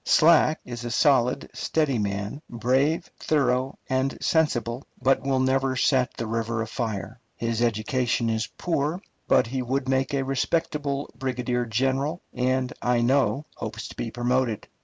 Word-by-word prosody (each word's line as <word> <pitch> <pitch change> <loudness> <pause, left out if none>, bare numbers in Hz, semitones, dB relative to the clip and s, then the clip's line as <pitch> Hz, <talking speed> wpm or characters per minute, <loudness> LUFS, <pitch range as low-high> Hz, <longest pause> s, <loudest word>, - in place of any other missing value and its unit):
Slack 160 -1 +5
is 120 -1 -6
a 120 - -3
solid, 130 0 +3
steady 150 -7 0
man, 100 +6 -3
brave, 130 +7 +1
thorough, 130 -3 +1
and 130 -1 0
sensible, 125 -6 0
but 135 +2 +3
will 135 -1 +1
never 130 0 +2
set 130 0 +2
the 115 - -3
river 115 0 -1
afire. 110 0 -4 0.2
His 115 0 -2
education 120 +1 +1
is 110 -1 0
poor, 165 0 -1 0.3
but - - +4
he 130 +3 -3
would 130 +2 -1
make 135 +1 +1
a 135 - +1
respectable 145 +1 -1
brigadier 125 -2 -2
general, 135 +8 0
and, 130 0 0
I 120 -1 +2
know, 130 +1 +2
hopes 110 0 -5
to - - -11
be 115 - -3
promoted. 120 -1 0
130 Hz, 145 wpm, -25 LUFS, 115-135 Hz, 0.3 s, Slack